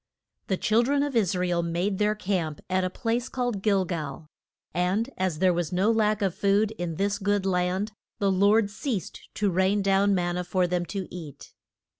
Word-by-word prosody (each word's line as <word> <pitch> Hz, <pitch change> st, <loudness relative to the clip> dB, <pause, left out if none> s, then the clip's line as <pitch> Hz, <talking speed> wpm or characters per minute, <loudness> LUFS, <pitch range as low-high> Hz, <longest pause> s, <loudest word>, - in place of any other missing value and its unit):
The 190 Hz, -, 0 dB
chil 220 Hz, +4 st, +3 dB
dren 280 Hz, +3 st, +1 dB
of 290 Hz, -3 st, -3 dB
Is 200 Hz, -6 st, +2 dB
ra 180 Hz, 0 st, 0 dB
el 175 Hz, -1 st, +1 dB
made 175 Hz, +4 st, -1 dB
their 210 Hz, 0 st, +2 dB
camp 180 Hz, -7 st, -2 dB
at 185 Hz, 0 st, +2 dB
a 185 Hz, -, 0 dB
place 235 Hz, +5 st, -2 dB
called 245 Hz, -6 st, -2 dB
Gil 195 Hz, -2 st, +2 dB
gal; 155 Hz, -4 st, -5 dB, 0.5 s
and 185 Hz, -, 0 dB
as 185 Hz, -4 st, -1 dB
there 185 Hz, +2 st, +3 dB
was 170 Hz, -2 st, -2 dB
no 190 Hz, +5 st, +2 dB
lack 215 Hz, -2 st, +1 dB
of 190 Hz, -3 st, +1 dB
food 200 Hz, +3 st, +2 dB
in 170 Hz, -2 st, -3 dB
this 200 Hz, +5 st, 0 dB
good 205 Hz, -1 st, 0 dB
land, 185 Hz, +3 st, 0 dB, 0.3 s
the 200 Hz, -1 st, +1 dB
Lord 200 Hz, +2 st, +3 dB
ceased 210 Hz, -2 st, -4 dB
to 205 Hz, -2 st, +1 dB
rain 190 Hz, +3 st, +2 dB
down 195 Hz, +1 st, +3 dB
man 175 Hz, -1 st, 0 dB
na -, -, 0 dB
for 180 Hz, +1 st, 0 dB
them 175 Hz, 0 st, -1 dB
to 195 Hz, -3 st, -4 dB
eat. 160 Hz, -6 st, -9 dB
195 Hz, 200 wpm, -26 LUFS, 180-210 Hz, 0.5 s, chil